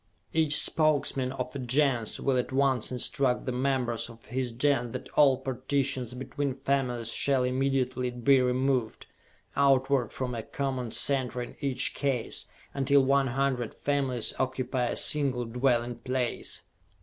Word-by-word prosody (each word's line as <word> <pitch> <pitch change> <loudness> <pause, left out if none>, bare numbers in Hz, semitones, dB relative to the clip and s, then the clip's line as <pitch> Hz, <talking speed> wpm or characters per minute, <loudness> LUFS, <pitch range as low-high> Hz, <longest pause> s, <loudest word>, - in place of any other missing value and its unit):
Each 155 -2 +5
Spokesman 145 -4 +2
of 135 - -5
a - - -3
Gens 125 -2 0
will 135 - +1
at 125 - -2
once 130 -3 +1
instruct 125 +1 +1
the 130 - -1
members 125 -3 -1
of 115 +1 -14
his 125 +1 -3
Gens 125 -1 0
that - - -6
all 135 -3 +4
partitions 130 -1 -2
between 135 +1 -3
families 130 -4 -1
shall 135 0 +1
immediately 130 -1 0
be 125 +2 +3
removed, 125 -2 0 0.5
outward 135 -3 +2
from 125 -1 -4
a 115 - -3
common 130 0 -3
center 125 +1 -1
in 120 - -10
each 135 -2 0
case, 135 -5 -1 0.3
until 140 0 +3
one 135 0 +3
hundred 130 -2 -1
families 135 -5 -1
occupy 130 -1 -1
a - - -2
single 135 -5 +2
dwelling 120 0 0
place. 125 0 -3
130 Hz, 140 wpm, -28 LUFS, 125-140 Hz, 0.5 s, Each